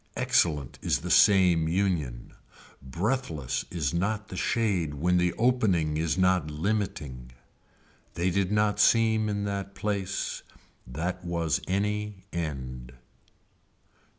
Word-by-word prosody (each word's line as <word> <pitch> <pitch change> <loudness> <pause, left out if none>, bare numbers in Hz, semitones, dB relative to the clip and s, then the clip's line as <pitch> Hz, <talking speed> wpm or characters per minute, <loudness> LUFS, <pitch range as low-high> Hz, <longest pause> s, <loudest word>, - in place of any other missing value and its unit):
Excellent 75 -6 +1
is - - 0
the - - -4
same 90 -5 +5
union. 80 -9 -1 0.5
Breathless 85 - -2
is 80 -4 -2
not 105 +4 -1
the - - -7
shade 90 -7 0
when 90 +5 +2
the 90 0 +2
opening 105 -11 +1
is 80 +2 0
not 90 -4 +2
limiting. 75 - -3 0.8
They 90 +2 0
did 95 +1 0
not 105 0 +1
seem 110 -1 +4
in 100 -1 -2
that 100 -1 -4
place. 100 -2 -2 0.5
That 85 +8 -4
was 85 -2 -1
any 105 0 -2
end. 65 -7 -5
90 Hz, 115 wpm, -27 LUFS, 75-100 Hz, 0.8 s, same